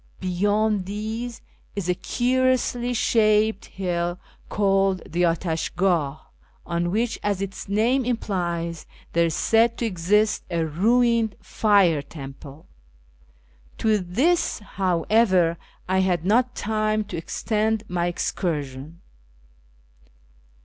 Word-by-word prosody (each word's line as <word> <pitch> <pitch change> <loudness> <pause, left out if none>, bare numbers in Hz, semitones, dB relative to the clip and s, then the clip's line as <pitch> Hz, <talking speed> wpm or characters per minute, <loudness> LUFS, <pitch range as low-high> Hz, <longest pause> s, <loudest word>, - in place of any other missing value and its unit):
Beyond 205 +2 0
these 220 +4 -5 0.3
is 200 -4 -3
a 180 - +3
curiously 250 +2 0
shaped 215 -2 +2
hill 175 -2 -2 0.3
called 195 -2 +1
the 175 +2 -2
Atash 165 -1 -1
gdh, 165 -6 +1 0.5
on 170 0 -1
which, 225 +4 -1
as 205 -2 -1
its 195 0 -6
name 235 +6 +2
implies, 175 -8 -2 0.3
there 170 0 +3
is 160 - -2
said 230 +1 +3
to 235 - -1
exist 210 +2 +1
a 170 -2 0
ruined 225 +6 +2
Fire 195 -8 +3
temple. 140 0 -11 1.1
To 215 -2 +2
this, 250 - +1
however, 185 -2 +1 0.3
I 190 +1 +2
had 180 -3 +1
not 245 +5 +2
time 215 0 0
to 205 - -7
extend 215 +5 -1
my 175 -1 -1
excursion. 155 -3 -3
195 Hz, 110 wpm, -24 LUFS, 170-220 Hz, 1.1 s, a